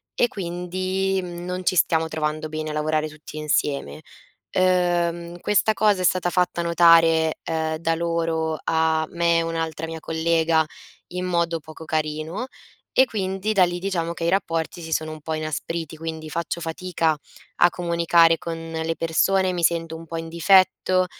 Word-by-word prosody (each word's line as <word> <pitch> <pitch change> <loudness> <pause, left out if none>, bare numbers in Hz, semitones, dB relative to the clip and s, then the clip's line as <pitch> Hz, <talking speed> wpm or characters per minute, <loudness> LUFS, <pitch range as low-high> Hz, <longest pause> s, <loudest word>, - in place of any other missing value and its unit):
e 240 - +3
quindi, 185 +1 -2
mhmm, 175 -1 -7
non 180 0 -4
ci 185 - +2
stiamo 160 -1 +3
trovando 155 0 -2
bene 155 0 -4
a - - -4
lavorare 155 0 0
tutti 155 0 -12
insieme. 140 - -1 0.5
Ehm, 175 -2 +1
questa 210 +3 +2
cosa 210 -3 +2
è - - -2
stata 180 0 +2
fatta 180 -1 +1
notare, 165 -2 +5
ehm, 160 -1 -2
da 165 0 0
loro 165 -1 -1
a 160 -1 +1
me 170 -1 +2
e 165 - +2
un'altra 165 -1 -3
mia 165 0 -6
collega 160 0 +2 0.5
in 180 0 -2
modo 170 -2 0
poco 155 +1 -12
carino, 155 +7 -2 0.5
e 260 - +5
quindi 195 0 -2
da 190 -3 +6
lì 175 0 -2
diciamo 175 -3 -2
che 170 0 -5
i - - +1
rapporti 170 -2 -1
si 160 0 -7
sono 155 0 -1
un 155 -1 -10
po' 160 - -4
inaspriti, 155 +1 -4
quindi 160 0 -6
faccio 170 +2 -3
fatica 165 -1 -1 0.4
a 175 - +5
comunicare 170 -1 +3
con 165 0 -5 0.3
le 165 - -1
persone, 185 +3 +2
mi 175 - -2
sento 165 -1 +1
un 165 - -10
po' 165 +1 -5
in 165 0 -6
difetto, 185 +2 +3
165 Hz, 165 wpm, -23 LUFS, 160-180 Hz, 0.5 s, da